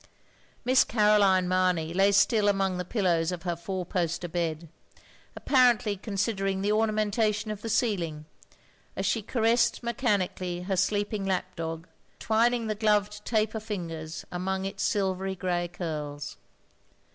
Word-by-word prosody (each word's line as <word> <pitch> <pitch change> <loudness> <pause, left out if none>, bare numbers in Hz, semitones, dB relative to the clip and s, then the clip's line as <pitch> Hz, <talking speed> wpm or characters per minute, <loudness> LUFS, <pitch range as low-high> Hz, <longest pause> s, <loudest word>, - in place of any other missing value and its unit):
Miss 255 +1 +5
Caroline 210 -4 +3
Mamey 180 -3 +1
lay 195 +2 +4
still 205 +1 +3
among 195 -2 +1
the - - -1
pillows 180 -4 +1
of 180 -2 -5
her 175 -2 -1
fotir 180 +1 -5
poster 175 -1 -1
bed; 165 -1 -3 0.7
apparently 245 -6 +3
con 200 +1 -7
sidering 195 -2 0
the 205 - +1
ornamentation 215 0 +1
of 210 -1 -6
the 225 - -5
ceiling, 180 -9 -1 0.7
as 195 - -2
she 220 +3 +1
caressed 230 +3 +1
mechanically 195 -7 -1
her 190 +1 -1
sleeping 205 +2 0
lap 185 -1 -2
dog; 165 +1 -5 0.3
twin 225 +2 +2
ing 235 -2 -3
the 215 - -1
gloved 210 -1 +1
taper 220 -1 0
fingers 165 -7 -6
among 190 +2 -2
its 195 +1 -5
silvery 190 -2 0
grey 175 -2 -1
ctirls. 150 -4 -5
195 Hz, 140 wpm, -28 LUFS, 175-215 Hz, 0.7 s, Miss